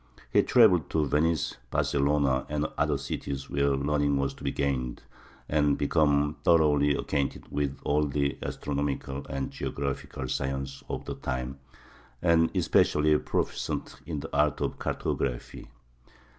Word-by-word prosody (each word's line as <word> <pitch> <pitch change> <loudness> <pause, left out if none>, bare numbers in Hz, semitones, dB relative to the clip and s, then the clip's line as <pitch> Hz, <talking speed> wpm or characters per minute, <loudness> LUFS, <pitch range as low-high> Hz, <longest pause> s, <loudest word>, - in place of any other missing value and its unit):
He - - +6
traveled 95 - +5
to 80 -2 +1
Venice, 80 +2 +1
Barcelona, 70 -1 +1
and 75 0 -1
other 75 -1 +1
cities 70 0 -5
where 70 0 +2
learning 70 0 +1
was 70 0 0
to - - -14
be - - 0
gained, 65 -3 -2 0.4
and 75 -2 +2
became 75 0 +2
thoroughly 75 -3 +4
acquainted 70 -1 -2
with 70 -2 -1
all 75 +1 +2
the 70 0 0
astronomical 70 -1 -3
and 70 0 -3
geographical 70 -1 -4
science 70 +1 -3
of - - -4
the - - -4
time, 65 +1 -4 0.6
and 85 -1 +4
especially 75 0 +3
proficient - - -3
in 75 -4 -3
the - - -6
art 75 +1 +2
of - - -2
cartography. 60 -1 -3
70 Hz, 130 wpm, -28 LUFS, 70-75 Hz, 0.6 s, He